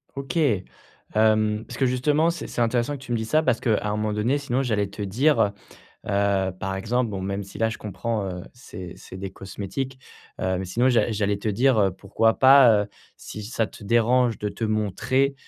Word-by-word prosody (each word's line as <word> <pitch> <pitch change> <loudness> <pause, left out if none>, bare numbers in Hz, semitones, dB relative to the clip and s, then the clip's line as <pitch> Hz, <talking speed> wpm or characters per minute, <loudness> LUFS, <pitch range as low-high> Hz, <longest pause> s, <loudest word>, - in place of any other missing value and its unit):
OK. 140 +2 -4 0.8
Hem, 110 0 +2
parce - - -8
que 135 - +2
justement, 145 +6 +2
c'est 170 - -6
c'est 120 - -3
intéressant 120 +4 +1
que 135 - -14
tu 120 - -9
me 120 - +1
dises 110 0 -4
ça, 155 +1 +3
parce 130 -4 +1
qu'à 110 -3 +1
un 105 - 0
moment 105 0 -1
donné, 115 +7 +1
sinon 135 -1 -1
j'allais 105 -5 0
te 100 - -9
dire, 115 +1 +2 0.6
heu, 100 -2 +1
par 95 0 -2
exemple, 115 +3 -1
bon, 95 - -4
même 100 +1 -3
si 100 - -11
là 110 0 +2
je 110 - -7
comprends, 105 +1 -3
heu, 90 -1 -5
c'est 95 -8 -9
c'est 95 - -11
des 95 0 -5
cosmétiques, 105 +8 -5 0.4
heu, 95 0 0
mais 95 - -3
sinon 120 +8 +2
j'a 120 -1 +2
j'allais 100 -1 0
te 110 - -3
dire, 120 +3 +3
heu, 100 -2 +3
pourquoi 110 +4 0
pas, 130 -6 +7
heu, - - -11 0.3
si 105 - -8
ça 115 0 -1
te - - -14
dérange 120 +1 +2
de 105 - -2
te 100 +3 -4
montrer, 115 +6 0
110 Hz, 210 wpm, -24 LUFS, 100-125 Hz, 0.8 s, pas